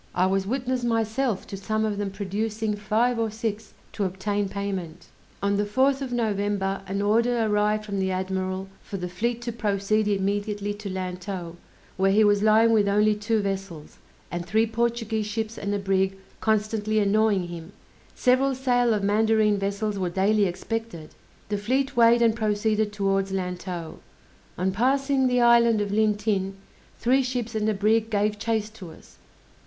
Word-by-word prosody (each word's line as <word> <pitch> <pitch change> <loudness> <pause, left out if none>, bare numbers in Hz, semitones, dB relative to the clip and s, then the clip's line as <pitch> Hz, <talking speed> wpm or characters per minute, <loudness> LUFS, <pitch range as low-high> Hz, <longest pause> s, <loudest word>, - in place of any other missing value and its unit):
I 180 - +3
was 190 0 0
witness 255 +1 -1
myself 225 0 0
to - - -7
some 215 +3 -1
of 205 -2 -2
them 205 -1 -1
producing 210 +2 -2
five 225 +4 +1
or 225 -1 0
six 220 0 -5 0.2
to 205 - -2
obtain 200 +2 -1
payment! 185 -4 -5 0.4
On 200 0 +2
the 205 - +1
4th 265 +6 +1
of 265 -2 -4
November 205 -4 -1
an 200 +1 -2
order 230 +2 +2
arrived 210 0 +1
from 200 -2 -3
the 190 0 0
admiral 185 0 -2
for 200 - -6
the 180 -1 -4
fleet 235 +6 -2
to 235 - -3
proceed 210 -1 0
immediately 205 +1 -1
to 205 0 -7
Lantow, 180 -1 -5 0.4
where 195 +1 +3
he 215 +2 +5
was 205 -1 +3
lying 220 +2 +5
with 210 -3 +3
only 210 +1 +3
two 210 +1 -1
vessels, 195 -6 -5 0.3
and 175 0 -3
three 220 +6 +2
Portuguese 225 -1 -1
ships 220 +1 -3
and 200 - -4
a 205 - 0
brig 195 -1 0 0.2
constantly 215 0 0
annoying 205 -3 +2
him; 170 +1 -8 0.4
several 260 +2 +2
sail 245 -3 +2
of 205 - -2
mandarine 215 0 +3
vessels 200 +1 -2
were 185 -2 -1
daily 200 +3 +2
expected. 190 -2 -4 0.4
The 205 -1 -1
fleet 265 +6 0
weighed 235 0 +5
and 225 -1 +3
proceeded 215 -1 0
towards 195 -1 0
Lantow. 180 -3 -4 0.6
On 185 +2 0
passing 265 +5 +2
the 250 -1 +2
island 235 -2 +5
of 205 -1 -2
Lintin, 205 -2 +1 0.4
three 260 +3 +3
ships 250 -3 -3
and 215 0 0
a 215 - 0
brig 220 +2 +2
gave 210 0 0
chase 220 -1 -1
to 195 -6 -10
us. 160 - -17
210 Hz, 165 wpm, -25 LUFS, 195-225 Hz, 0.6 s, he